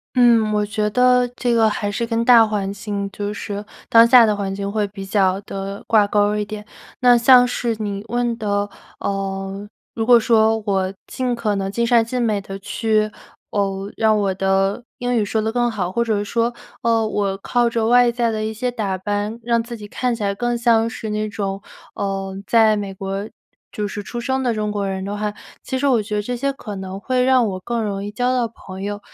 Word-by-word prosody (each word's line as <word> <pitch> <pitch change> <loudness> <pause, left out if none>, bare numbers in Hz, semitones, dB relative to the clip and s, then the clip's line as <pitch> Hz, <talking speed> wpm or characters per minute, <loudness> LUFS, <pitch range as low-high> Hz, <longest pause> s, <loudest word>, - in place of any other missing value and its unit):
嗯， 235 -3 +5
我 210 0 +1
觉 210 0 -1
得 250 +2 +4
这 245 -1 0
个 225 -1 +4
还 205 -1 -2
是 235 +3 -2
跟 230 0 0
大 235 -2 +7
环 200 -2 -2
境 200 0 -4
就 205 0 -4
是 205 0 -5 0.3
当 230 0 +7
下 240 -1 +8
的 210 -1 +1
环 195 -1 -3
境 200 0 -3
会 210 -1 0
比 195 -1 -8
较 195 -1 +2
地 195 0 -6
挂 215 -2 +4
钩 205 0 +2
儿 210 0 -1
一 - - 0
点。 210 0 -7 0.4
那 245 -1 +6
像 245 +1 +6
是 240 -2 -1
你 200 -2 -3
问 240 +1 0
的， 205 -2 0 0.3
呃， 195 0 -4 0.2
如 225 -1 -2
果 240 -1 +8
说 220 -1 +3
我 190 -2 0
尽 250 -1 -2
可 220 -3 -1
能 195 0 -2
尽 235 +3 0
善 235 -1 +4
尽 250 +3 -3
美 215 -4 0
地 195 0 -7
去， 215 +2 0 0.4
呃， 195 0 -2
让 220 -1 +3
我 200 -2 +1
的 195 +3 0
英 245 0 -1
语 225 - +2
说 215 +2 -1
得 220 - -1
更 240 0 +1
好， 190 -6 -3
或 235 +5 +1
者 220 -3 0
是 205 - -2
说， 235 +2 0 0.3
呃， 230 -2 +2
我 200 -2 -1
靠 240 +4 +1
着 230 -1 -1
外 245 +1 +5
在 235 -1 0
的 215 -1 -2
一 215 - -2
些 245 +3 -2
打 205 -6 -2
扮， 205 +3 -3
让 235 0 +1
自 235 +1 -7
己 210 -1 -9
看 245 +3 -1
起 220 - -5
来 200 0 0
更 240 +3 -1
像 230 -1 +3
是 220 -1 -6
那 215 0 -2
种， 195 -1 -4 0.3
呃， 195 -1 -3
在 220 -2 +5
美 200 -2 -4
国 195 +2 -4 0.4
就 210 -1 -3
是 205 +1 -5
出 240 +4 -6
生 265 +3 -1
的 250 -2 +1
中 210 -1 -1
国 205 -1 -2
人 190 0 -3
的 200 +1 -4
话， 210 0 -2 0.3
其 260 - -3
实 270 - -1
我 250 -5 +3
觉 210 0 -4
得 210 - +1
这 245 +4 -3
些 275 +3 -1
可 215 -6 -8
能 190 0 -6
会 255 +3 0
让 255 -1 +4
我 185 -2 -4
更 230 +4 -2
容 200 -2 -3
易 205 - -5
交 245 +4 0
到 245 -2 +1
朋 190 -3 -11
友。 205 +1 -4
215 Hz, 240 characters per minute, -20 LUFS, 200-235 Hz, 0.4 s, 下